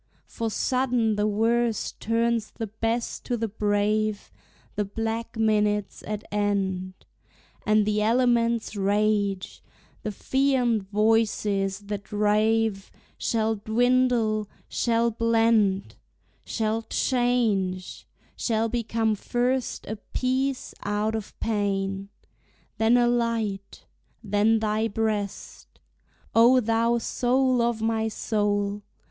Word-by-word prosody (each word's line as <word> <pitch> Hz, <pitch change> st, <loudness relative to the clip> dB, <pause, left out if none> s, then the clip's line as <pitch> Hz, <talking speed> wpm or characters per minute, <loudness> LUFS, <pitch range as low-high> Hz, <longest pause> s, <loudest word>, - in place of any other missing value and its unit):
For 225 Hz, -1 st, -4 dB
sudden 245 Hz, -2 st, +1 dB
the 210 Hz, 0 st, +1 dB
worst 225 Hz, +2 st, 0 dB
turns 230 Hz, -1 st, 0 dB
the 225 Hz, -, -5 dB
best 225 Hz, +3 st, -3 dB
to 245 Hz, -, -1 dB
the 225 Hz, 0 st, -1 dB
brave, 210 Hz, 0 st, 0 dB, 0.4 s
The 210 Hz, -, 0 dB
black 225 Hz, +3 st, -4 dB
minute's 210 Hz, -2 st, +1 dB
at 210 Hz, 0 st, -4 dB
end, 195 Hz, -3 st, -1 dB, 0.7 s
And 215 Hz, 0 st, +4 dB
the 210 Hz, 0 st, +1 dB
elements' 235 Hz, 0 st, +2 dB
rage, 205 Hz, -1 st, 0 dB, 0.4 s
the 215 Hz, -, -3 dB
fiend 245 Hz, -3 st, +1 dB
voices 210 Hz, -2 st, +1 dB
that 205 Hz, 0 st, -6 dB
rave, 210 Hz, 0 st, +1 dB, 0.3 s
Shall 220 Hz, -1 st, 0 dB
dwindle, 230 Hz, -1 st, +1 dB, 0.2 s
shall 235 Hz, 0 st, +1 dB
blend, 225 Hz, -3 st, +2 dB, 0.5 s
Shall 220 Hz, 0 st, -1 dB
change, 225 Hz, -8 st, 0 dB, 0.3 s
shall 225 Hz, -1 st, 0 dB
become 225 Hz, -1 st, 0 dB
first 245 Hz, +4 st, -1 dB
a 215 Hz, -, -5 dB
peace 260 Hz, +4 st, -2 dB
out 210 Hz, +2 st, -1 dB
of 220 Hz, -2 st, -6 dB
pain. 195 Hz, -2 st, -1 dB, 0.7 s
Then 225 Hz, +2 st, +4 dB
a 240 Hz, -1 st, +4 dB
light, 230 Hz, -5 st, -2 dB, 0.4 s
then 210 Hz, +2 st, +3 dB
thy 215 Hz, 0 st, 0 dB
breast, 215 Hz, -2 st, -4 dB, 0.5 s
O 240 Hz, +3 st, +6 dB
thou 230 Hz, +1 st, +1 dB
soul 250 Hz, +1 st, +1 dB
of 235 Hz, -2 st, 0 dB
my 225 Hz, 0 st, +1 dB
soul! 205 Hz, -2 st, -1 dB
220 Hz, 105 wpm, -25 LUFS, 205-230 Hz, 0.7 s, O